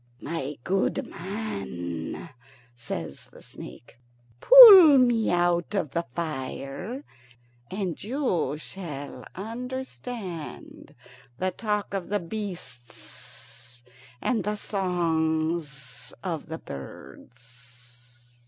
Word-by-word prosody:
"My 150 -3 -4
good 195 +1 0
man," 100 - -5 0.5
says 85 - -6
the - - -16
snake, 120 - -12 0.4
"pull 395 - +11
me 240 -3 +3
out 175 +2 +1
of 155 -8 -1
the 170 -2 -2
fire, 160 - -5 0.7
and 190 -4 -4
you 200 - -1
shall 155 -4 -7
understand 230 - -7 0.4
the 185 +4 0
talk 210 -2 -2
of 195 -3 -3
the 205 0 +1
beasts 165 - -9 0.4
and 235 -6 0
the 210 +2 -1
songs 160 - -1
of 165 -5 -4
the 160 0 -5
birds." 120 - -13
170 Hz, 90 wpm, -26 LUFS, 130-210 Hz, 0.7 s, pull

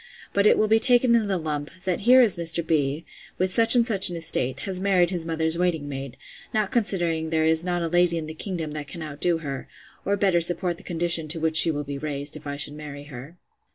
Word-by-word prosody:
But 200 +1 +3
it - - +4
will 215 - +1
be 220 +1 +3
taken 245 +1 +3
in 225 -3 +2
the 195 -2 -1
lump; 150 -3 -4 0.2
that 185 -2 -1
here 255 +1 +8
is 225 -6 +3
Mr. 170 -1 +2
B——, 150 0 -1 0.3
with 185 0 -1
such 230 +1 +4
and 235 -1 +3
such 200 -6 +6
an 175 - -6
estate, 135 -5 -1
has 190 -2 -4
married 185 -3 +2
his 170 -3 -3
mother's 160 0 -1
waiting 170 -5 -1
maid: 135 -2 -7 0.4
not 215 -2 0
considering 170 -8 -1
there 160 -1 0
is 160 +1 +2
not 175 -1 -2
a - - -1
lady 175 0 +1
in 160 - -4
the 155 - -7
kingdom 165 -2 -5
that 150 -1 -7
can 165 +3 -8
out 145 -2 -9
do 175 -2 +2
her, 140 -4 -7 0.4
or 200 +1 -1
better 190 -4 +1
support 175 +1 0
the - - -14
condition 165 -2 +1
to 165 +2 -3
which 160 0 -1
she 165 - +8
will 145 -2 -3
be 140 -1 -7
raised, 145 0 -4
if 150 -1 -10
I 140 0 -5
should 145 0 -2
marry 150 -1 -9
her. 140 +8 -11
165 Hz, 245 wpm, -24 LUFS, 150-185 Hz, 0.4 s, here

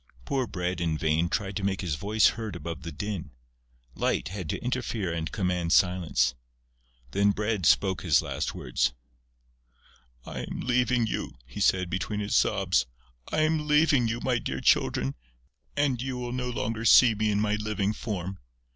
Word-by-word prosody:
Poor 130 -3 -1
Bread 90 -3 -3
in 80 -2 0
vain 80 +2 +1
tried 100 -1 -2
to 100 - -4
make 95 -1 0
his 90 -6 -2
voice 105 +8 +3
heard 110 -4 -5
above 85 -1 -6
the 85 0 -6
din. 100 +3 -4 0.6
Light 60 +2 -1
had 90 -4 -6
to - - -1
interfere 120 -7 -2
and 80 -1 -3
command 90 -3 0
silence. 85 -9 +3 0.8
Then 100 +8 +3
Bread 105 -4 0
spoke 95 +2 +3
his 80 -6 +4
last - - -3
words: 65 - 0 1.3
"I - - -6
am - - -5
leaving 125 -1 +2
you," 110 - -4
he - - -9
said, 90 -1 +3
between 95 +4 -3
his 105 0 -1
sobs. - - +2 0.4
"I 155 - +1
am 155 -1 +1
leaving 150 -5 +4
you, 115 +1 -2
my 125 -2 +1
dear 65 -11 -4
Children, 65 +1 +2 0.6
and 135 -4 +1
you 130 -1 -3
will 120 0 -4
no 125 0 -2
longer 115 -1 -3
see 115 +1 +7
me 110 0 0
in 105 -1 +1
my 105 0 +1
living 105 -1 -1
form.... 95 -4 -5
100 Hz, 170 wpm, -27 LUFS, 85-115 Hz, 1.3 s, see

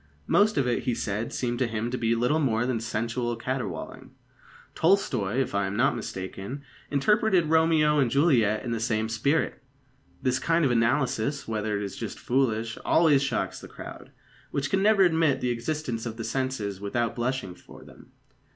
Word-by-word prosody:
Most 210 - +3
of 135 - +2
it, 120 - -1
he 125 - +1
said, 105 +2 -3
seemed 120 -1 -2
to 130 - +2
him 115 +1 -3
to 125 - -2
be 115 0 +1
little 125 +7 +1
more 120 -5 +1
than 125 -2 -1
sensual 115 +2 -2
caterwauling. 115 -7 -5 0.6
Tolstoi, 130 - +1
if 135 - -1
I 100 -1 +1
am 95 - -4
not 120 +4 +2
mistaken, 100 +4 -6 0.3
interpreted 180 - +2
Romeo 160 -2 +4
and 130 -4 +3
Juliet 120 -6 +2
in 120 - -3
the 115 - -1
same 110 -1 0
spirit. 140 +8 0 0.6
This 130 +1 0
kind 165 -1 +2
of 130 - +2
analysis, 120 +3 +1
whether 110 -1 -1
it 100 - -3
is 100 - -5
just - - -6
or - - -15
foolish, 115 -3 0
always 155 -5 +4
shocks 140 - -2
the - - -9
crowd, - - -10 0.4
which 140 0 -2
can 195 - +2
never 205 -1 +5
admit 160 -6 +3
the 125 -2 0
existence 120 -1 -3
of 115 -1 -6
the 115 - -4
senses 110 -7 -3
without 115 +3 -1
blushing 120 -5 -2
for - - -15
them. - - -16
125 Hz, 180 wpm, -27 LUFS, 115-145 Hz, 0.6 s, never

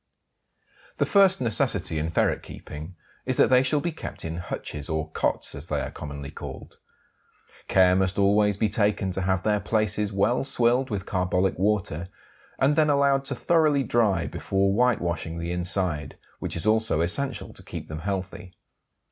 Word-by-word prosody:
The - - +2
first 195 -2 +5
necessity 105 -8 0
in 80 +1 -2
ferret 80 - +1
keeping 80 +5 -9 0.3
is - - 0
that - - +4
they 125 0 +6
shall 145 +3 +1
be 170 - -2
kept 160 - -8
in 80 +1 -4
hutches 75 -4 -6
or 80 0 -2
"cotes," - - -1
as - - -6
they - - -1
are - - -4
commonly 70 -1 -7
called. - - -9 0.9
Care 90 -1 +5
must 95 0 +1
always 100 0 +3
be 110 - +2
taken 105 -3 0
to 95 - -2
have 95 -1 0
their 105 -1 +2
places 105 0 0
well 105 +6 +1
swilled 125 0 +2
with 100 -3 -3
carbolic 90 -1 0
water, 95 -4 0 0.5
and 140 +2 +3
then 155 -1 +3
allowed 140 -1 +3
to - - -2
thoroughly 155 -5 +2
dry 105 -8 +1
before 95 +2 0
whitewashing 85 -8 0
the 85 +1 -4
inside, 90 -5 -1 0.2
which - - -4
is 85 - -2
also 110 -5 +2
essential 135 +12 0
to - - -11
keep - - -8
them 80 0 -6
healthy. 95 0 -5
100 Hz, 165 wpm, -25 LUFS, 85-120 Hz, 0.9 s, they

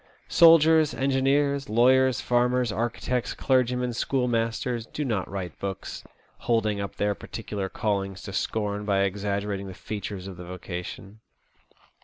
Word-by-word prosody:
Soldiers, 160 -2 +6
engineers, 140 +1 +1
lawyers, 130 +3 +4
farmers, 125 -1 +2
architects, 120 +2 -2
clergymen, 125 -1 +1
schoolmasters 120 -1 -1
do 150 - -4
not 110 -7 -1
write 95 -4 -6
books, 100 -1 -5 0.4
holding 110 -3 0
up 100 - -5
their 105 0 +1
particular 100 -2 -5
callings 100 -3 -2
to 100 - -7
scorn 105 0 -2
by 100 -2 +1
exaggerating 100 0 -2
the 95 - -8
features 100 -2 -6
of 95 -2 -8
the 90 - -8
vocation. 90 +3 -7
110 Hz, 125 wpm, -26 LUFS, 100-125 Hz, 0.4 s, Soldiers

